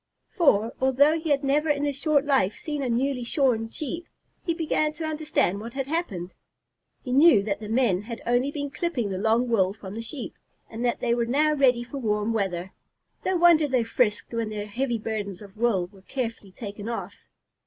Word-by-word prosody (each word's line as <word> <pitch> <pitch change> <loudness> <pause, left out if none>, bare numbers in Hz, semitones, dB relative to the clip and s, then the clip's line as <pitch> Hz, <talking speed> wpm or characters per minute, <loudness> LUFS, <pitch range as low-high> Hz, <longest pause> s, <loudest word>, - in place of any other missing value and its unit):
For, 230 - +3
although 285 +5 +4
he 320 0 -4
had 285 -1 +2
never 295 +3 +2
in 290 -1 +1
his 285 -1 -1
short 290 0 +2
life 265 -9 +2
seen 295 -2 -4
a 260 - -1
newly 250 +2 0
shorn 235 -3 +1
Sheep, 335 +7 -5 0.4
he 345 - 0
began 310 -2 0
to 320 +1 -5
understand 305 - 0
what 230 +2 -7
had 270 -1 -2
happened. 235 - -3 0.7
He 250 - -5
knew 270 -6 +6
that 200 -1 -2
the 215 -1 -7
men 225 -6 +2
had 230 +2 -7
only 245 +3 +2
been 285 -1 -4
clipping 260 - -2
the 185 - -3
long 225 +4 +2
wool 195 -5 +2
from 200 -2 -9
the 225 - -4
Sheep, 230 +2 -6 0.4
and 225 +2 -5
that 240 -1 0
they 235 - +2
were 235 -1 0
now 300 +5 +3
ready 255 -4 +3
for 275 +3 -7
warm 210 -1 0
weather. 190 -4 -2 0.5
No 375 -1 +1
wonder 335 -3 +6
they 255 -3 +2
frisked 225 -1 0
when 230 -2 -1
their 210 -1 -4
heavy 240 +3 -1
burdens 210 -4 -4
of 200 -2 -13
wool 220 -5 +1
were 190 +1 -18
carefully 225 -3 -5
taken 205 +2 -7
off. 235 - -4
240 Hz, 200 wpm, -26 LUFS, 210-285 Hz, 0.7 s, knew